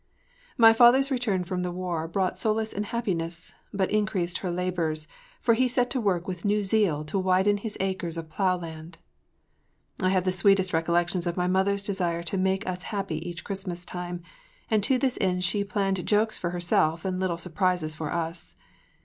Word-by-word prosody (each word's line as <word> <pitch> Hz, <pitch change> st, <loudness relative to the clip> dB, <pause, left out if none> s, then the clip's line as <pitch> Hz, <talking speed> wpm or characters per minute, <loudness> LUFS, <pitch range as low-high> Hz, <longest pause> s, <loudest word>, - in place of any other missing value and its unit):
MY 225 Hz, -2 st, +8 dB
father’s 255 Hz, +4 st, +6 dB
return 225 Hz, -8 st, 0 dB
from 180 Hz, 0 st, -3 dB
the 180 Hz, 0 st, -2 dB
war 175 Hz, -3 st, -3 dB
brought 185 Hz, +2 st, 0 dB
solace 220 Hz, 0 st, 0 dB
and 205 Hz, +1 st, -3 dB
happiness, 170 Hz, -8 st, -2 dB, 0.2 s
but 195 Hz, -2 st, -1 dB
increased 200 Hz, -5 st, 0 dB
her 185 Hz, -, -3 dB
labors, 170 Hz, -3 st, -2 dB, 0.3 s
for 230 Hz, -, +3 dB
he 255 Hz, +3 st, +3 dB
set 245 Hz, 0 st, +1 dB
to 260 Hz, -, 0 dB
work 185 Hz, -4 st, 0 dB
with 180 Hz, -2 st, -5 dB
new 210 Hz, 0 st, +1 dB
zeal 190 Hz, -7 st, +2 dB
to 175 Hz, +6 st, -1 dB
widen 190 Hz, +2 st, +3 dB
his 210 Hz, +1 st, -5 dB
acres 185 Hz, -3 st, -2 dB
of 165 Hz, -1 st, -5 dB
plow 185 Hz, +3 st, +1 dB
land. 165 Hz, -1 st, -9 dB, 1.0 s
I 185 Hz, -, +2 dB
have 185 Hz, -1 st, +2 dB
the 185 Hz, -, +1 dB
sweetest 185 Hz, 0 st, +3 dB
recollections 170 Hz, +2 st, +1 dB
of 175 Hz, -, -2 dB
my 180 Hz, -, +1 dB
mother’s 190 Hz, +2 st, +1 dB
desire 175 Hz, -4 st, -1 dB
to 170 Hz, +3 st, -3 dB
make 190 Hz, +2 st, +1 dB
us 180 Hz, 0 st, -3 dB
happy 195 Hz, -7 st, -2 dB
each 170 Hz, -1 st, -7 dB
Christmas 190 Hz, -3 st, -5 dB
time, 175 Hz, -1 st, -6 dB, 0.5 s
and 215 Hz, -1 st, +4 dB
to 265 Hz, -, +3 dB
this 255 Hz, 0 st, 0 dB
end 180 Hz, -2 st, +1 dB
she 200 Hz, +3 st, +1 dB
planned 195 Hz, -2 st, -1 dB
jokes 215 Hz, +1 st, +2 dB
for 175 Hz, -, -3 dB
herself 170 Hz, -2 st, +1 dB
and 185 Hz, -1 st, -1 dB
little 185 Hz, -3 st, 0 dB
surprises 175 Hz, -2 st, -1 dB
for 155 Hz, -1 st, -5 dB
us. 170 Hz, 0 st, -4 dB
185 Hz, 185 wpm, -27 LUFS, 175-205 Hz, 1.0 s, MY